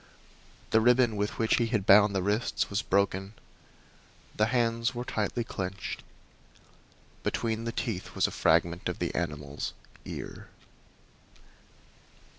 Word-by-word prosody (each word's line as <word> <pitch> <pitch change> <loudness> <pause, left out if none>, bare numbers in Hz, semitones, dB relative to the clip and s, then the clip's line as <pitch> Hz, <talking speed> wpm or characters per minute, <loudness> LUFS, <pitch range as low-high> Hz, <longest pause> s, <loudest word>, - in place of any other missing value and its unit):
The 110 - +5
ribbon 120 -1 +4
with 105 0 -2
which 110 -1 +2
he 115 - +2
had 110 -5 -1
bound 105 0 +6
the 95 - +1
wrists 105 +3 0
was 100 - +1
broken; 100 +1 0 1.0
the 110 - +3
hands 115 0 +1
were 120 +1 -4
tightly 110 +2 -1
clenched. 95 -4 -5 1.2
Between 115 0 -1
the 115 - -1
teeth 110 -5 -4
was - - +3
a - - -1
fragment 85 +2 +2
of - - -4
the - - -2
animal's 75 -1 -3 0.3
ear. - - -7
105 Hz, 125 wpm, -29 LUFS, 95-115 Hz, 1.2 s, bound